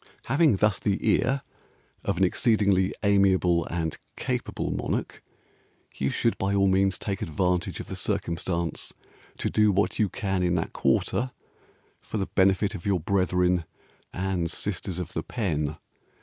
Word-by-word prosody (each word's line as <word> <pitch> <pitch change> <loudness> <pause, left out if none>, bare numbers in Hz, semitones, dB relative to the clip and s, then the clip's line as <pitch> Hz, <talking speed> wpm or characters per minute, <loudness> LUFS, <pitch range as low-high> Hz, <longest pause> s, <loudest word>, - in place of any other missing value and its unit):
Having 145 -3 +4
thus 105 +2 +2
the 100 -1 +1
ear 135 +3 +2 0.6
Of - - -1
an - - +3
exceedingly 100 -4 +3
amiable 95 -4 +3
and 80 -2 -3 0.2
capable - - -2
Monarch, - - -3 0.7
You 70 - -1
should 115 - 0
by 100 +1 +1
all 100 0 +4
means 95 0 +3
Take 100 -2 -4
advantage 90 +2 0
of - - -5
the - - -6
circumstance 85 0 -2 0.4
To - - -1
do 105 -1 +4
what 100 +1 +1
you 105 -3 +3
can 95 -2 -1
in 90 -1 +2
that 80 - -2
quarter 130 +2 +1 0.7
For - - -5
the 95 - 0
benefit 95 +2 +2
of 90 -5 -7
your 100 -3 +1
brethren 90 0 +2 0.5
and 90 -2 -1
sisters 95 0 -3
of 90 -3 -5
the - - -1
pen. 80 -9 -2
95 Hz, 150 wpm, -26 LUFS, 90-100 Hz, 0.7 s, Having